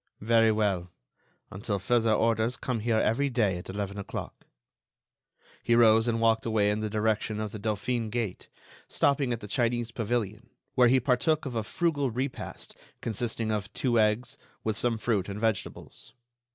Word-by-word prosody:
"Very 115 0 +4
well. 100 -5 0 0.6
Until 100 +2 -2
further 115 +3 +2
orders 115 +2 +1
come 125 -3 -2
here 110 +1 +1
every 130 +6 +2
day 105 -8 +1
at 90 - -11
eleven 100 +1 -4
o'clock." 100 - -7 1.1
He 120 - +2
rose 115 -1 +5
and 115 -1 +1
walked 115 0 +3
away 105 -2 +2
in 105 - -1
the 110 0 -2
direction 110 0 0
of 110 -1 -3
the 110 - -7
Dauphine 110 +2 -1
gate, 115 -4 -4 0.4
stopping 140 -2 +1
at 115 -1 -2
the 105 - -7
Chinese 120 +1 0
pavilion, 115 -1 -2 0.2
where 125 -2 +5
he 130 +2 +5
partook 145 +5 +1
of 130 - -4
a 115 - 0
frugal 145 +2 0
repast 130 +3 -5 0.2
consisting 115 0 -2
of 105 -1 -2
two 120 -3 +1
eggs, 105 +3 +1 0.2
with 110 -1 -1
some 120 +1 0
fruit 105 -4 -1
and 100 +1 -5
vegetables. 110 -3 -3
115 Hz, 165 wpm, -28 LUFS, 105-120 Hz, 1.1 s, rose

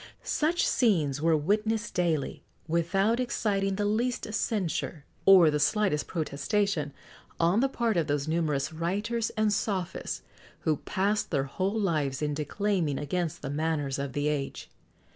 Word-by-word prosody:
Such 325 +3 +1
scenes 155 - +2
were 160 0 +4
witnessed 210 +7 0
daily, 165 -5 0 0.3
without 195 +8 +1
exciting 200 -5 0
the 205 +1 -1
least 220 +1 -1
censure, 170 -8 -2 0.2
or 180 -5 +8
the 150 - 0
slightest 150 +1 +1
protestation, 165 +1 -1 0.5
on 170 +5 +3
the 270 +2 +2
part 235 -6 0
of 165 - +1
those 145 0 -1
numerous 155 -3 0
writers 205 +8 -1
and 215 -1 +3
sophists, 195 -4 -2 0.4
who 155 -2 +1
passed 205 +6 -1
their 140 -4 +1
whole 190 +10 -1
lives 150 -8 0
in 150 0 0
declaiming 160 0 -1
against 160 +3 -2
the 135 - -3
manners 145 -2 -1
of 140 -2 -3
the 145 +1 0
age. 145 -2 -3
170 Hz, 145 wpm, -28 LUFS, 150-210 Hz, 0.5 s, or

